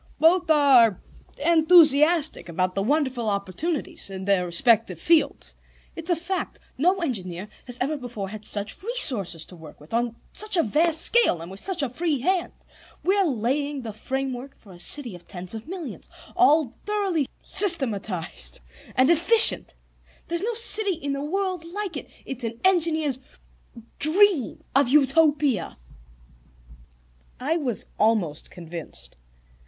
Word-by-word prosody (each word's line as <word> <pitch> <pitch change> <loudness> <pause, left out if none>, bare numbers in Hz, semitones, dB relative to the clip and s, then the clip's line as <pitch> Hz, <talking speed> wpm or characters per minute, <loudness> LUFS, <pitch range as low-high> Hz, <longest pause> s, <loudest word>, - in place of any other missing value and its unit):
"Both 340 +1 +3
are 265 - +4 0.5
enthusiastic 320 - +4
about 185 +2 -1
the 195 - -2
wonderful 260 -2 -1
opportunities 200 - -4
in 190 -1 -7
their 195 -3 +1
respective 180 -1 +2
fields. 330 - 0 0.4
It's 330 +1 -5
a 350 - +3
fact: 355 +3 -5 0.2
no 360 +7 +1
engineer 190 - -5 0.2
has 245 -1 -4
ever 285 +4 -1
before 235 -7 -7
had 215 +1 -9
such 205 0 -3
resources 250 - +3
to 180 - -13
work 160 -3 -14
with, 150 +6 -15
on 235 0 -1 0.2
such 425 -3 +2
a 335 - +3
vast 315 +7 +2
scale, 470 - +2
and 170 +2 -9
with 195 - -8
such 370 - -2
a - - 0
free 310 +4 -2
hand. 365 +6 -1 0.5
We're 390 0 +2
laying 275 +2 -2
the 220 -2 -7
framework 265 +3 -5
for 200 - -18
a 175 - -14
city 245 +3 +2
of 175 -1 -14
ten 180 0 -9 0.2
millions, 350 -4 -8 0.3
all 305 -7 +3
thoroughly 390 -9 -1 0.2
systematized 220 - 0 0.4
and 260 +1 +3
efficient. 435 +8 +6 0.5
There 340 - -3
is 340 - 0
no 460 +3 -2
city 435 -4 +5
in 285 -3 -5
the 275 - -4
world 370 +3 -3
like 370 +1 -6
it; 285 - -7 0.2
it's 260 -2 -4
an 230 0 -5
engineer's 320 -7 +1 0.8
dream 335 - +3
of 275 -3 +3
Utopia." 285 - +2 1.6
I 305 +6 -1
was 255 - -4
almost 210 -9 0
convinced. 165 - -10
275 Hz, 140 wpm, -24 LUFS, 210-335 Hz, 1.6 s, efficient